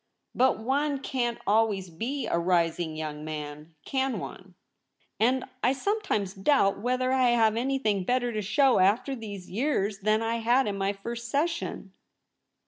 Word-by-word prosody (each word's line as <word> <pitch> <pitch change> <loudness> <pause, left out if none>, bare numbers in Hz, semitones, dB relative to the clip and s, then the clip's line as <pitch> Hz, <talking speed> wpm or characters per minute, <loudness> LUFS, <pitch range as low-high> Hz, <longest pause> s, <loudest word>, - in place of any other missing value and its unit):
But 260 +1 +3
one 280 +6 0
can't 245 -3 -2
always 205 -4 +1
be 245 - -3
a 170 - 0
rising 170 -2 +1
young 155 -1 -5
man, 150 +1 -7
can 265 -3 -1
one? 185 0 -9 0.6
and 250 +3 +2 0.2
I 250 - +3
sometimes 275 - -1
doubt 200 -1 +2
whether 255 +3 0
I 260 -1 +3
have 225 -2 +3
any 265 +4 0
thing 210 -7 0
better 245 +3 0
to 215 - -1
show 260 +6 +3
after 210 +8 +2
these 205 -6 -8
years 210 -3 0
than 215 +2 +1
I 230 +1 0
had 240 +4 +3
in 205 -2 -2
my 195 0 0
first 235 +4 -6
session.' 295 - -2
225 Hz, 155 wpm, -27 LUFS, 195-260 Hz, 0.6 s, But